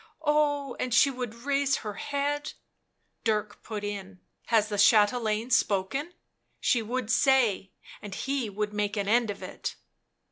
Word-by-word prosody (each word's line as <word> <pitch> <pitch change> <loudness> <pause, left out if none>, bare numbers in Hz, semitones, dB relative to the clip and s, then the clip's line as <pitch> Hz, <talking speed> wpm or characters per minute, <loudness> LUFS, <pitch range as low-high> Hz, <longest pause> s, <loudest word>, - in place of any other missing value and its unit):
Oh, 290 -3 +1
and 255 - -2
she 275 +3 +6
would 250 -3 -5
raise 280 -1 +2
her 210 - -3
head 285 +4 -2 0.3
" - - -48
Dirk 210 -2 -1
put 215 -2 -6
in: 200 -2 -6 0.3
"'Has 220 -2 +3
the 205 -1 -2
chatelaine 215 +2 +3
spoken?' 255 - +1 0.5
she 240 - +2
would 235 0 -3
say, 250 -7 +3 0.3
and 205 -2 -7
he 270 -4 -2
would 210 +1 -3
make 210 0 -1
an 200 -1 -1
end 230 +1 +3
of 205 - -5
it." - - -5
225 Hz, 150 wpm, -28 LUFS, 205-270 Hz, 0.5 s, she